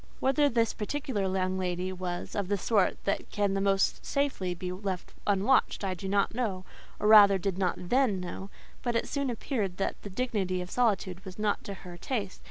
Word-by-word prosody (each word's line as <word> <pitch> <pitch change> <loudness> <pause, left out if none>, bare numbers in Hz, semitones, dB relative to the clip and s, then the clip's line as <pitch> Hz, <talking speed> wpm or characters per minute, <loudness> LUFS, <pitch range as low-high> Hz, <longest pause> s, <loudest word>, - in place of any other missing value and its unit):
Whether 285 +2 +3
this 230 -2 +1
particular 210 -4 -2
young 185 0 0
lady 180 0 -2
was 180 -1 -4
of 200 -3 -1
the 205 +1 +1
sort 200 0 +2
that 200 - -1
can 205 -2 0
the 195 - 0
most 195 0 +2
safely 265 -11 -1
be 180 +1 -4
left 185 -1 -4
unwatched, 205 +4 +2
I 190 -1 0
do 190 +2 -5
not 200 0 +2
know: 205 -6 -2 0.3
or, 210 - +1
rather 205 -2 +9
did 190 0 -2
not 180 -2 +1
then 220 +1 +1
know; 180 +2 -6 0.3
but 240 -2 -1
it 230 - 0
soon 280 -2 -1
appeared 220 -6 -2
that 195 - -2
the 205 - -7
dignity 195 -4 -1
of 180 0 -6
solitude 195 -6 0
was 185 -1 -9
not 210 -1 0
to 200 - -5
her 175 -1 -8
taste. 205 -3 -3
195 Hz, 195 wpm, -29 LUFS, 185-225 Hz, 0.3 s, rather